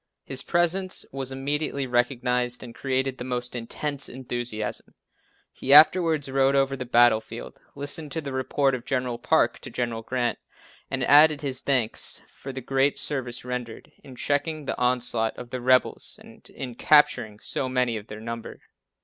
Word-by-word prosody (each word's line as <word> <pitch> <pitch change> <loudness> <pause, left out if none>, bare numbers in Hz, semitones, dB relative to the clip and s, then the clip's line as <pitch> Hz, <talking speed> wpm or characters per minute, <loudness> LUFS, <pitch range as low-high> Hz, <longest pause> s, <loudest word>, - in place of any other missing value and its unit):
His 130 -1 -1
presence 180 +2 0
was 135 -1 -4
immediately 140 +1 -2
recognized 125 0 0
and 120 -2 -9
created 130 0 -2
the - - -4
most 125 -1 -3
intense 135 +4 -3
enthusiasm. 120 -4 -4 0.6
He 135 +2 +3
afterwards 160 -1 +6
rode 135 0 +2
over 135 0 +2
the 130 -1 -5
battlefield, 120 -2 +2
listened 145 +1 -4
to - - -2
the 140 -3 -6
report 135 +1 +1
of 125 -2 -3
General 125 -2 -2
Parke - - +2
to - - -9
General 120 -2 -3
Grant, 120 +1 -2 0.5
and - - -1
added 150 +1 +6
his 135 -3 -2
thanks 125 -5 -1
for 135 - -9
the 130 0 -6
great 135 +3 +1
service 125 -4 -2
rendered 125 -2 -6
in 130 -2 -12
checking 145 +3 -1
the - - -2
onslaught 125 -2 +1
of 120 -1 -9
the 130 - -4
rebels 130 +1 +2
and - - -15
in 125 -2 -7
capturing 115 -6 +3
so 130 - -2
many 125 -2 +1
of 105 -1 -7
their 105 - -8
number. 115 +1 -7
130 Hz, 160 wpm, -25 LUFS, 120-140 Hz, 0.6 s, afterwards